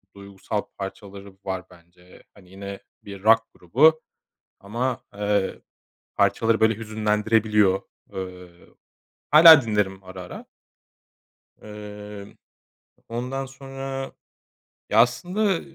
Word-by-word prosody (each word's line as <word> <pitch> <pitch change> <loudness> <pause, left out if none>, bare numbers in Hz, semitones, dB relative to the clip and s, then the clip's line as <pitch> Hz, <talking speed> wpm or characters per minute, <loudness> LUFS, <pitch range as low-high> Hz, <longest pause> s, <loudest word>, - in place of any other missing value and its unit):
duygusal 100 +1 -5 0.2
parçaları 100 0 -8
var 95 -1 -4
bence. 90 +1 -19
Hani 95 -3 -18
yine 100 0 -8 0.2
bir 100 -1 -10
rock 115 +1 +6
grubu 155 - +3 0.6
ama, 120 +5 -3
eee, 100 -1 -1 0.5
parçaları 115 -1 +2
böyle 110 0 +4
hüzünlendirebiliyor. 105 -2 +1 0.3
Eee, 90 -1 -7 0.8
hâlâ 160 0 +10
dinlerim 105 -3 -1
ara 95 0 -9
ara. 90 - -10 1.2
Eee, 105 -1 -10 0.7
ondan 125 +3 -4
sonra 135 0 -7 0.8
ya 105 - +3
aslında 180 - +1
105 Hz, 90 wpm, -24 LUFS, 95-120 Hz, 1.2 s, hâlâ